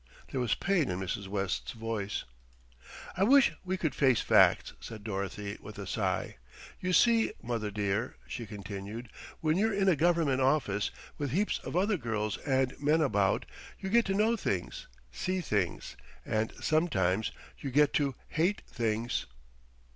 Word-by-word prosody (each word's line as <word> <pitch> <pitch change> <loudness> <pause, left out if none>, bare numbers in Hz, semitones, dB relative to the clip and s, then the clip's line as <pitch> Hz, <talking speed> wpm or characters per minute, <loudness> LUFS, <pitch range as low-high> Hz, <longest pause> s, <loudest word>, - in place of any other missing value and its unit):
There 130 - -1
was 120 -2 +1
pain 195 -7 +1
in 90 - -2
Mrs. 95 +1 -3
West's 95 -1 -2
voice. 110 -3 -3 0.9
"I 180 - -3
wish 270 - +6
we 185 0 -1
could 160 -5 -1
face 130 -5 +3
facts," - - +4
said 110 -2 -9
Dorothy 100 0 -4
with 105 0 -10
a 100 - -5
sigh. - - -1 0.4
"You 185 - -1
see, 230 +4 +4
mother 115 -3 -2
dear," 105 +3 -1
she 115 -3 -6
continued, 105 +3 -7 0.3
"when 155 +1 +2
you're 220 +2 +3
in 195 -1 +2
a 185 - +5
government 160 -4 +2
office, 130 -7 +2 0.3
with 145 -2 -1
heaps 200 +10 0
of - - -6
other 200 +3 +2
girls 110 - -2
and 130 -2 +1
men 150 +3 +3
about, 100 -10 +2 0.3
you 190 - -4
get 235 0 +5
to 195 - 0
know 220 +3 +3
things, - - -3 0.2
see 185 0 -2
things, 105 - -1 0.3
and 110 +1 0
sometimes 110 - +1 0.3
you 140 - -4
get 145 +2 +4
to 140 -3 +1
hate 175 +6 0
things." 115 0 -1
130 Hz, 155 wpm, -31 LUFS, 105-175 Hz, 0.9 s, wish